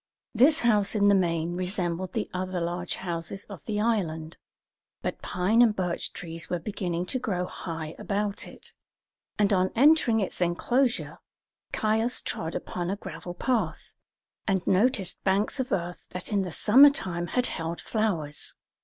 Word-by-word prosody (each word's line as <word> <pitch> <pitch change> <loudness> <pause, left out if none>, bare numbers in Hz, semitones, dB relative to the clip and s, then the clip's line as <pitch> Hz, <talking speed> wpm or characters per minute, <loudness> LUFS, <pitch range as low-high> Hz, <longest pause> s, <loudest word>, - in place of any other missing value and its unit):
This 285 +8 +5
house 210 -3 +2
in 205 -1 +4
the - - +6
main 170 -2 +1
resembled 180 -1 -2
the - - -1
other 185 0 -2
larger 175 +1 -3
houses 175 +1 -4
of 195 -8 -11
the 210 -1 -2
island; 170 -8 -1 0.7
but - - -3
pine 190 +6 +2
and 225 -3 +5
birch 180 -3 -2
trees 165 -2 -7
were 175 - 0
beginning 175 -1 -3
to 255 +8 -1
grow 180 -7 -1
high 165 -3 -6
about 205 0 -1
it, - - -11 0.6
and 205 -1 +3
on 185 0 +3
entering 270 -3 +5
its 195 -2 -2
enclosure 240 +9 +1 0.5
Caius 220 +3 +1
trod 160 +1 -3
upon 175 -1 -3
a 195 - 0
gravel 180 -3 -8
path, 215 -6 -1 0.6
and 190 -3 +1
noticed 200 -1 +1
banks 200 +7 +1
of 260 0 -2
earth 175 0 -3
that 180 +3 -5
in 200 - +3
the 185 -2 -3
summer 260 - +7
time 175 -10 -2
had 250 +5 0
held 165 -4 -3
flowers. 175 -10 -2
190 Hz, 155 wpm, -27 LUFS, 175-220 Hz, 0.7 s, summer